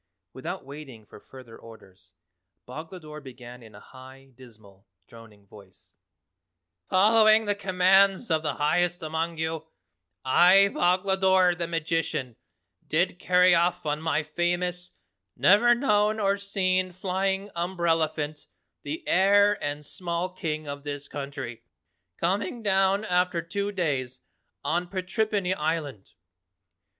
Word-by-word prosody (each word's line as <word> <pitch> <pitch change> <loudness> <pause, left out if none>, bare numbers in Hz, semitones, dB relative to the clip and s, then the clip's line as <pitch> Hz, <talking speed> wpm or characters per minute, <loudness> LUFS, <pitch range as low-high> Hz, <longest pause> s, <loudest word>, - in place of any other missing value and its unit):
Without 170 +5 -6
waiting 135 -6 -11
for - - -14
further 130 -4 -14
orders, 95 -4 -16 0.5
Boglodore 155 +2 -9
began 125 -2 -12
in 110 -2 -15
a - - -12
high, 130 +3 -15
dismal, 110 -6 -18 0.2
droning 110 -2 -16
voice: 100 -2 -18 0.9
"Following 215 +3 +5
the 205 - +1
commands 195 +1 +2
of 160 -1 +2
the 155 - -3
highest 175 +4 0
among 160 +1 -3
you, 160 0 -3 0.6
I, 185 +8 +5
Boglodore 190 0 +3
the 170 -1 -4
Magician, 165 -6 -2 0.5
did 175 +3 0
carry 180 0 +4
off 175 0 +1
on 150 0 -2
my 160 -1 0
famous, 175 +3 -2 0.4
never 205 - +5
known 215 -4 +1
or 200 -1 +2
seen 185 -2 -1
flying 190 +2 -2
umbrellaphant 165 -4 -1 0.3
the 150 +3 -6
heir 200 +2 +4
and 145 +1 -4
small 170 +2 -3
King 155 -4 -4
of 140 -1 -7
this 145 -1 -5
country, 135 -5 -7 0.6
coming 200 +6 -2
down 195 +1 +2
after 180 -2 +1
two 200 +5 -3
days, 135 -9 -2 0.4
on 175 +2 -1
Patrippany 195 +1 -1
Island. 150 - -4
170 Hz, 120 wpm, -26 LUFS, 145-190 Hz, 0.9 s, Following